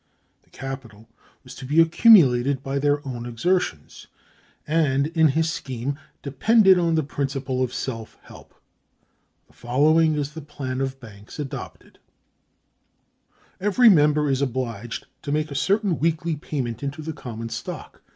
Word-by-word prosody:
The - - -33
capital 125 -5 -8 0.4
was 130 -1 -11
to - - -11
be 145 +5 +1
accumulated 140 - +5
by 135 +1 -2
their 145 0 0
own 120 -2 -5
exertions, 120 - -2 0.6
and, 145 -3 +1
in 160 -1 +5
his 160 +3 0
scheme 130 +1 -5 0.2
depended 190 - +4
on 170 -2 +1
the 160 - +1
principle 135 -2 -3
of 130 - 0
self 115 -4 -6
help. - - -15 0.9
The - - -27
following 155 +6 +2
is 145 -1 -2
the 160 - -7
plan 130 -3 -5
of 135 0 -3
banks 105 -4 -13
adopted: 145 -3 -8 1.6
"Every 210 +5 +5
member 150 -4 +4
is 135 -1 0
obliged 120 -4 -3 0.2
to 145 - -5
make 155 +1 -1
a - - -4
certain 195 +4 +1
weekly 165 +1 0
payment 130 -6 -4
into 145 +2 -5
the 160 +1 -5
common 115 -5 -7
stock. - - -7
140 Hz, 140 wpm, -23 LUFS, 130-160 Hz, 1.6 s, accumulated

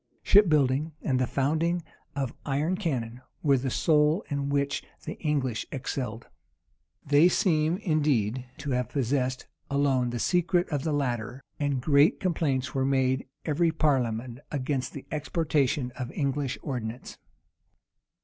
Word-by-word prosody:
Ship 205 -2 +6
building 150 +1 +2
and 130 -3 +1
the 130 - +1
founding 160 +7 0 0.3
of 135 -4 -2
iron 145 +6 0
cannon 125 - -3 0.2
were 140 -3 +5
the 130 +1 -2
sole 150 - +2
in 140 0 -1
which 140 -1 0 0.2
the - - -4
English 135 -7 -1
excelled. 125 -4 -4 0.8
They 145 +5 +5
seem, 165 -2 +2
indeed, 135 - 0
to 145 -2 -4
have 125 -2 0
possessed 130 -1 -1 0.2
alone 140 -3 +2
the 120 - -3
secret 175 +5 +2
of 145 -4 -1
the 160 - -1
latter; 125 -3 -2 0.2
and 140 -4 0
great 145 +2 +4
complaints 150 -8 0
were 135 - +1
made 130 -1 +1 0.2
every 165 +2 +2
parliament 125 -6 0
against 135 -2 -2
the 140 - -8
exportation 150 -4 0
of 125 0 -6
English 140 -2 -1
ordnance. 125 -4 -5
140 Hz, 135 wpm, -27 LUFS, 130-155 Hz, 0.8 s, Ship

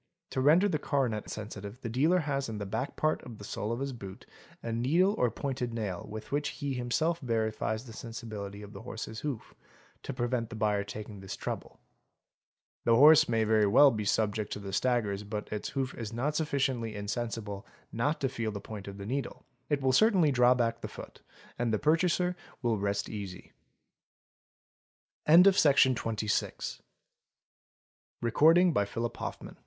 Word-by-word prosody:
'To 130 - -1
render 160 +9 +5
the 155 -6 0
coronet 130 -8 -1
sensitive, 105 +1 -7
the - - -4
dealer 155 +10 +2
has 140 -4 -2
in 110 - -4
the 100 - -4
back 110 +7 -3
part 155 0 +1
of 115 -3 -10
the 105 - -11
sole 105 +2 -3
of 115 - -2
his 135 0 -3
boot 100 -5 -9 0.4
a 115 - -3
needle 155 - +3
or 125 - +2
pointed 125 0 -3
nail 100 -6 -4
with 110 0 -8
which 145 0 0
he 140 -2 -2
himself 145 +7 0
verifies 110 -1 -1
the 115 - -10
sensibility 110 -4 -7
of 105 +1 -11
the - - -9
horse's 110 -1 -6
hoof, 140 -7 -5 0.5
to - - -5
prevent 120 -2 -1
the 115 - -7
buyer 105 -2 +1
taking 105 0 -8
this 95 0 -6
trouble. - - -6 1.0
The 115 - +4
horse 150 +4 +7
may 115 -1 +2
very 110 -1 +3
well 140 +8 +7
be 110 -3 -2
subject 105 0 0
to - - -5
the 100 -1 -7
staggers 105 -4 0
but 105 +1 -5
its 105 - -3
hoof 135 -1 -2
is 115 -2 -6
not 135 +6 -1
sufficiently 135 -8 -1
insensible 105 -1 -4 0.2
not 145 +7 0
to 135 - +2
feel 115 -4 -3
the 100 - -5
point 100 0 -8
of 100 0 -7
the 100 - -7
needle; 135 +5 -4 0.2
it 145 -2 0
will 130 -1 +3
certainly 190 - +5
draw 125 -1 +5
back 115 -1 0
the - - -4
foot - - -11 0.4
and 120 -1 +1
the 110 - +2
purchaser 175 +5 +2
115 Hz, 155 wpm, -30 LUFS, 105-140 Hz, 1.0 s, horse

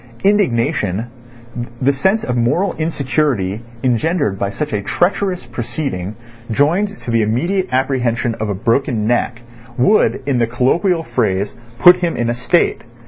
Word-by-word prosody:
Indignation, 115 - +1 0.7
the 140 +2 +2
sense 190 +11 +1
of 125 - -2
moral 125 +12 +1
insecurity 140 - -1 0.2
engendered 130 - +1
by 100 - 0
such 145 +7 -4
a 105 - 0
treacherous 175 - 0
proceeding 120 - -4 0.3
joined 175 - +1
to 120 - -4
the 115 -1 +3
immediate 170 - 0
apprehension 125 -3 0
of 110 -1 -2
a 100 - -1
broken 115 +1 0
neck, 120 0 0 0.3
would, 165 - +3
in 135 -3 +1
the 115 - +2
colloquial 165 - +1
phrase, 100 -8 -1 0.2
put 180 +6 +8
him 175 -2 -1
in 120 0 0
a - - 0
state. 125 +8 +1
125 Hz, 140 wpm, -17 LUFS, 115-165 Hz, 0.7 s, put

